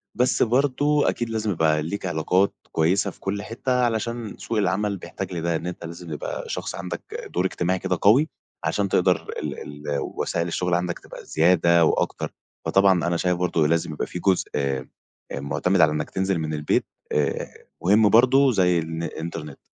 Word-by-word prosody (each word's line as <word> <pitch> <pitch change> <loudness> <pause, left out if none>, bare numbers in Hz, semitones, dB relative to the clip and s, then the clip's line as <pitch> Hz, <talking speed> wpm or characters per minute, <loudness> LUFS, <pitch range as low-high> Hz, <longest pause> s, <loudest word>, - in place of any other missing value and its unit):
بس 125 +1 +3
برضو 145 +4 +2
أكيد 120 -1 0
لازم 110 -2 -1
يبقى 80 -3 +2
ليك 95 +6 -4
علاقات 90 +3 +2 0.2
كويّسة 95 +5 +2
في - - -21
كل 100 +1 -3
حتّة 125 +3 -1
علشان 115 -1 -2
سوق 115 - -3
العمل 100 0 +1
بيحتاج 95 +1 -6
لده، 85 0 -1
إن 85 - -3
أنت 90 -1 -6
لازم 85 0 -8
يبقى 75 - -5
شخص - - -4
عندك 90 +1 -5 0.3
دور 90 +1 +1
إجتماعي 90 0 0
كده - - -1
قوي 130 +10 +5 0.3
عشان 100 -1 0
تقدر 90 -3 +2
ال - - -4 0.3
ال 70 -1 0
وسائل 85 +1 -2
الشغل 90 +1 -1
عندك 90 0 0
تبقى - - -11
زيادة 85 0 +4
و - - +3
أكتر. - - -2 0.3
فطبعًا 95 -3 +4
أنا 85 0 +1
شايف 90 0 +1
برضو 85 -3 +1
لازم 80 0 +1
يبقى 75 - -3
في 90 - -6
جزء 95 +1 +2
آآ 70 -2 -1 0.5
معتمد 70 +7 +1
على 80 -2 +6
إنّك 75 -1 -2
تنزل 95 -2 0
من 80 -1 -3
البيت 75 0 +1 0.3
آآ، 75 -2 -2 0.2
مهم 105 +4 +5
برضو 130 +4 +5
زي 90 -5 +3
الن 80 0 -4
الإنترنت. 80 -3 -6
90 Hz, 175 wpm, -24 LUFS, 80-105 Hz, 0.5 s, على